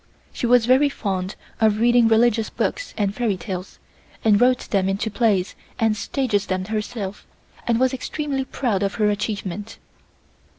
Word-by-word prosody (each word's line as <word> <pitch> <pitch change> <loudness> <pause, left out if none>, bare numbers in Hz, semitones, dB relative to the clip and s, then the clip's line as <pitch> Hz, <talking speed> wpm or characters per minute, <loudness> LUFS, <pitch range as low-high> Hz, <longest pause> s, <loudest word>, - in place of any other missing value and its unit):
She 240 - -2
was 245 -1 +5
very 260 +4 +4
fond 190 -7 -3 0.2
of 215 -2 +3
reading 240 0 +5
religious 225 0 +3
books - - -3
and 200 -2 0
fairy 220 -4 0
tales, 185 -1 -6 0.5
and 210 -1 +5
wrote 250 0 +3
them 195 -2 +2
into 200 +3 -1
plays 205 -5 +1 0.2
and 225 -1 +2
staged 215 -2 -1
them 185 0 -1
herself, 210 -1 -4 0.4
and 235 -1 +2
was 260 0 +2
extremely 275 0 -3
proud 235 -8 -1
of 200 0 -1
her 210 -2 +2
achievement. 205 0 -4
220 Hz, 155 wpm, -22 LUFS, 200-245 Hz, 0.5 s, was